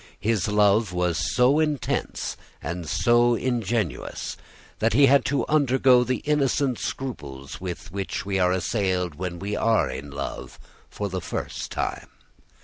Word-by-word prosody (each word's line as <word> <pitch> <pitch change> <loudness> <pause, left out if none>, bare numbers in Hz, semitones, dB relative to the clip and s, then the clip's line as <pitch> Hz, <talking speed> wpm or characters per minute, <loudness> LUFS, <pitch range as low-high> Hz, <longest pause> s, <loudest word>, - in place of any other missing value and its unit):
His 105 -4 0
love 105 0 +3
was 90 -3 0
so 130 +4 +4
intense 150 -4 -1 0.2
and 85 -2 -5
so 120 +6 +4
ingenuous, 115 - -2 0.4
that 115 0 +2
he 140 +4 +6
had 140 +1 +5
to 140 - 0
undergo 130 -4 +4
the 130 +1 -2
innocent 140 -3 +1
scruples 75 - -6
with 90 0 -6
which 100 0 -4
we 100 -1 0
are 90 -1 +3
assailed 95 -2 0
when 85 +3 -5
we 100 +4 -3
love 70 -12 -1 0.3
for 105 - -4
the 95 -1 -4
first - - -4
time. - - -3
105 Hz, 135 wpm, -25 LUFS, 90-125 Hz, 0.4 s, he